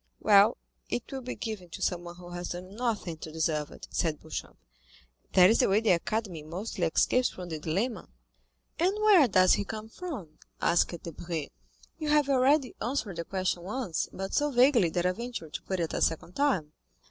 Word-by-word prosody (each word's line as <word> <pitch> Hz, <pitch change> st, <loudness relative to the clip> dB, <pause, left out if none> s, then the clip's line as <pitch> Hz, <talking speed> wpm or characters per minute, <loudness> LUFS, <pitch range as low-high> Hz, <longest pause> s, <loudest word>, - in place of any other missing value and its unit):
"Well, 205 Hz, +1 st, +5 dB, 0.3 s
it 245 Hz, -, -3 dB
will 270 Hz, -1 st, -4 dB
be 250 Hz, 0 st, -5 dB
given 210 Hz, -6 st, -6 dB
to -, -, -8 dB
someone 175 Hz, -1 st, -2 dB
who 175 Hz, 0 st, -11 dB
has 175 Hz, 0 st, -5 dB
done 180 Hz, +2 st, -7 dB
nothing 215 Hz, -8 st, -2 dB
to 155 Hz, -, -7 dB
deserve 155 Hz, -2 st, -1 dB
it," -, -, -11 dB
said 160 Hz, -3 st, 0 dB
Beauchamp; 160 Hz, -, -7 dB, 0.8 s
"that 185 Hz, +2 st, +7 dB
is 230 Hz, -, +3 dB
the -, -, +4 dB
way 200 Hz, +2 st, +4 dB
the 225 Hz, -2 st, +2 dB
Academy 180 Hz, -1 st, -1 dB
mostly 180 Hz, +5 st, -3 dB
escapes 250 Hz, +9 st, +2 dB
from 180 Hz, -1 st, -8 dB
the 160 Hz, -2 st, -4 dB
dilemma." 190 Hz, +7 st, -2 dB, 0.7 s
"And 365 Hz, +4 st, +2 dB
where 420 Hz, -9 st, +6 dB
does 185 Hz, -3 st, +5 dB
he -, -, +1 dB
come 215 Hz, +3 st, -7 dB
from?" 230 Hz, -, -7 dB, 0.2 s
asked 170 Hz, 0 st, +1 dB
Debray. 165 Hz, -2 st, -5 dB, 0.5 s
"You 305 Hz, -2 st, -2 dB
have 295 Hz, -2 st, +3 dB
already 270 Hz, 0 st, +3 dB
answered 225 Hz, -7 st, -2 dB
the 170 Hz, -, -3 dB
question 185 Hz, -1 st, -1 dB
once, 200 Hz, -2 st, -3 dB
but 195 Hz, +1 st, -5 dB
so 295 Hz, 0 st, +2 dB
vaguely 245 Hz, -, +4 dB
that 175 Hz, +2 st, -1 dB
I 180 Hz, -, +4 dB
venture 225 Hz, -6 st, -6 dB
to -, -, -5 dB
put 190 Hz, -1 st, -3 dB
it 165 Hz, -2 st, -2 dB
a -, -, -2 dB
second 165 Hz, +2 st, 0 dB
time." 195 Hz, -, +1 dB
190 Hz, 190 wpm, -29 LUFS, 170-245 Hz, 0.8 s, that